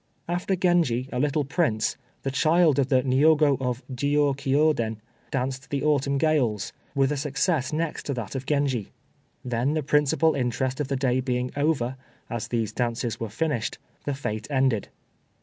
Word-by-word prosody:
After 175 +3 0
Genji, 170 -9 +2
a 125 - -1
little 145 +2 +1
prince, 135 -7 0 0.3
the 135 - -1
child 155 +2 +3
of 135 - +2
the 130 -2 +3
Niogo 145 +2 +4
of 125 0 -2
Jiôkiô 145 +2 +2
den, 110 -4 -3 0.3
danced 135 0 -3
the 140 -1 -2
"Autumn 140 -2 +2
Gales," 135 -9 +1 0.2
with 135 0 +3
a 150 - -1
success 145 0 0
next 160 +1 -2
to 140 - 0
that 115 -5 -5
of 135 -1 -5
Genji. 140 -8 0 0.6
Then, 125 +4 0
the 155 - 0
principal 150 +3 +3
interest 130 0 -1
of 145 - -1
the 135 - -1
day 130 -1 +1
being 125 -1 -1
over, 140 -4 0 0.3
as 120 -1 -3
these 115 -3 -1
dances 120 -1 -2
were 115 - -3
finished, 125 0 -2 0.3
the 145 - -1
fête 110 -6 -4
ended. 130 -6 +1
135 Hz, 165 wpm, -26 LUFS, 125-150 Hz, 0.6 s, Niogo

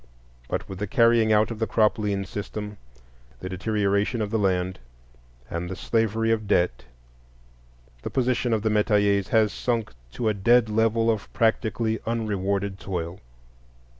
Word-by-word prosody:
But - - -3
with 95 -1 -8
the 105 - -2
carrying 115 -1 +4
out 110 +1 +3
of 110 - -6
the 115 - 0
crop 110 +1 +2
lien 100 -2 -1
system, 105 +1 -6 0.6
the 95 - -6
deterioration 100 +3 0
of 105 -1 -2
the 110 - +1
land, 95 -2 0 0.7
and 85 +4 -4
the 95 - -4
slavery 115 +2 0
of 110 -2 0
debt, 85 -12 +1 1.2
the - - -4
position 125 -2 0
of 110 -2 +1
the 110 - +1
metayers 105 -2 +2
has 110 -3 +2
sunk 115 - -2 0.2
to 115 - -2
a 110 - +3
dead 115 +3 +3
level 115 +1 +2
of 110 -3 -4
practically 110 -1 +1
unrewarded 100 -3 -1
toil. 90 -2 -4
105 Hz, 150 wpm, -25 LUFS, 100-115 Hz, 1.2 s, carrying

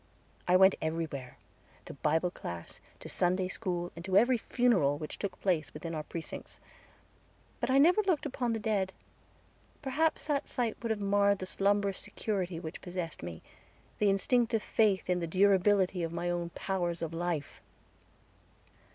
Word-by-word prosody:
I 180 - +5
went 190 +1 +7
everywhere, 160 -5 -3 0.5
to - - -8
Bible 160 +5 +1
class, 85 - -7 0.2
to - - -8
Sunday 185 +1 +1
school, 180 -3 -3
and 170 - -8
to 190 +1 +2
every 240 +3 +4
funeral 210 - +2
which 155 0 -7
took 200 - -4
place 165 -7 0
within 165 +2 -5
our 155 - -2
precincts. 160 +2 -8 1.0
But - - -1
I 260 - +4
never 350 +9 +6
looked 370 -8 0
upon 250 -4 -1
the - - 0
dead; 200 -3 0 0.9
perhaps 305 +3 +1
that 295 -1 0
sight 235 -4 -1
would 230 - -3
have 220 -1 0
marred 200 0 +3
the 185 - -5
slumbrous 200 0 +1
security 190 -4 -3
which 160 -2 -7
possessed 175 -2 -5
me 85 -1 -7 0.6
the 210 - +4
instinctive 225 +3 +2
faith 205 -4 +2
in 180 -1 +1
the 170 - -2
durability 190 0 +3
of 165 -1 -2
my 175 +1 -2
own 175 -1 -2
powers 175 -3 -2
of 165 0 -4
life. 165 -3 -3
190 Hz, 160 wpm, -31 LUFS, 170-215 Hz, 1.0 s, went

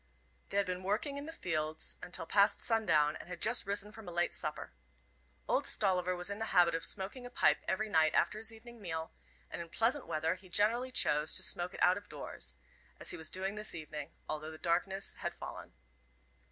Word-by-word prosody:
They 200 - -2
had 200 - +4
been 180 0 -3
working 215 +9 -1
in 285 +2 -6
the - - -5
fields 155 - -2
until 175 -2 -4
past 200 +4 +4
sundown, 155 -10 +3
and - - -11
had 180 -1 -6
just 225 -2 +2
risen 205 +1 +1
from 220 -2 -11
a - - -5
late 175 0 +1
supper. - - -3 0.7
Old - - +2
Stolliver 185 -2 +2
was 180 +2 -1
in 200 - -4
the 225 - -1
habit 175 -1 +7
of 165 0 -1
smoking 205 +6 -3
a 245 - -7
pipe 245 - +3
every 215 +3 0
night 160 -5 +3
after 215 - +2
his 220 0 -3
evening 230 +1 -12
meal, 160 -3 -4 0.4
and - - -3
in 170 - -8
pleasant 240 - +1
weather 160 +2 +1
he 185 0 -12
generally 230 +7 +2
chose 150 -9 +2
to - - +4
smoke 175 +2 +1
it - - -1
out 180 +2 +5
of 205 - -21
doors, - - -4 0.4
as - - -1
he - - -5
was 160 - -2
doing 190 +1 -2
this 210 -2 -3
evening, 155 -2 -6 0.2
although 155 0 -3
the 160 - -8
darkness 180 +4 +1
had - - -2
fallen. - - -8
185 Hz, 210 wpm, -34 LUFS, 165-215 Hz, 0.7 s, habit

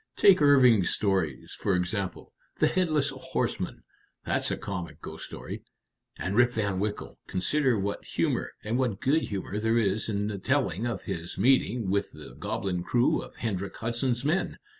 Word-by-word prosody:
Take 190 -5 +6
Irving's 125 - +6
stories, 95 -9 0
for 95 - +1
example. 90 +1 -3 0.2
The - - +4
'Headless 155 -6 +1
Horseman' 130 - -3 0.4
that's - - 0
a - - -1
comic 90 -4 -5
ghost - - -8
story. - - -7 0.6
And 95 +2 -2
Rip 120 +1 +6
Van 100 -5 -1
Winkle 105 +1 -4
consider 130 +6 +2
what 100 +1 -2
humor, - - -1
and 115 +4 -1
what 120 -7 0
good 145 +4 +2
humor, 100 -2 -3
there 110 +2 +2
is 105 -1 +1
in 100 -1 0
the 105 -2 -3
telling 95 +4 0
of 115 -6 -3
his 85 +1 -5
meeting 115 -3 +3
with 100 0 0
the - - -11
goblin 90 -3 -2
crew 120 +7 +2
of - - -11
Hendrik 100 -4 -3
Hudson's 120 +2 -1
men! 170 +6 0
105 Hz, 160 wpm, -28 LUFS, 95-125 Hz, 0.6 s, Take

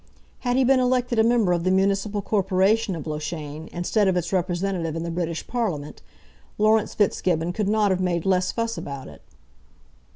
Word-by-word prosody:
Had 245 0 0
he 265 - +4
been 260 +1 +4
elected 250 -2 +1
a - - +6
member 230 -5 +3
of 170 -1 -1
the 185 - +1
municipal 195 +2 +1
corporation 195 +1 +1
of 160 - -7
Loughshane, 155 0 -5
instead 195 +4 +1
of 185 -1 +2
its 175 +1 -2
representative 175 -2 -1
in 165 - -3
the 170 - -4
British 165 -1 -3
Parliament, 180 -12 -3 0.6
Laurence 215 0 +2
Fitzgibbon 175 -4 +1
could 205 +1 -1
not 210 -2 +2
have 185 0 0
made 175 -2 -1
less 185 -1 +2
fuss 230 0 -2
about 140 -2 -7
it. - - -13
190 Hz, 175 wpm, -24 LUFS, 170-215 Hz, 0.6 s, a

